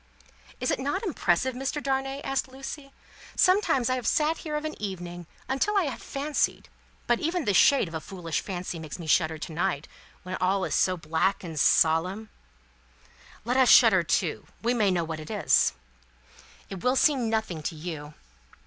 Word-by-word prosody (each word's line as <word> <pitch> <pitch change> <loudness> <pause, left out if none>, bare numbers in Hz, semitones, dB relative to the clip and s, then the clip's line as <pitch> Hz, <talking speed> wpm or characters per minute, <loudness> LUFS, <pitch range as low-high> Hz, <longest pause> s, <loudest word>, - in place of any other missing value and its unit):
"Is 250 - 0
it - - -1
not 285 - -2
impressive, 260 - +1
Mr. 270 +4 -3
Darnay?" 270 0 -2
asked 270 -1 -1
Lucie. 270 +2 -8 0.4
"Sometimes, 365 - +3
I 255 - +1
have 250 -3 -3
sat 310 +1 +1
here 305 -3 -4
of 300 +1 -3
an 310 - -3
evening, 175 -4 -6 0.2
until 400 +11 0
I 390 - +4
have 275 -6 -4
fancied 285 +2 -2 0.4
but 240 -1 +2
even 330 -1 -1
the 205 - +2
shade 265 +3 +5
of 165 - -10
a 160 - -4
foolish 165 -1 -4
fancy 180 -3 -5
makes 155 -3 -7
me 170 - -8
shudder 160 0 +2
to 160 - -7
night, 165 -3 -1 0.4
when 185 +1 -4
all 190 +1 +1
is - - -3
so 185 -1 +2
black 165 +5 0
and 165 -4 -5
solemn 180 +10 +2 0.6
" 65 - -26
"Let 250 +2 0
us 260 -2 +5
shudder 220 -7 +7
too. 170 0 -1 0.2
We 240 +2 +2
may 215 -5 +2
know 175 -2 +1
what 160 -1 -5
it 155 - -9
is." - - +3 0.9
"It 195 -3 -8
will 250 +1 +2
seem 265 -5 +3
nothing 220 -8 -2
to 160 - -4
you. 155 -2 -7
200 Hz, 185 wpm, -27 LUFS, 170-270 Hz, 0.9 s, shudder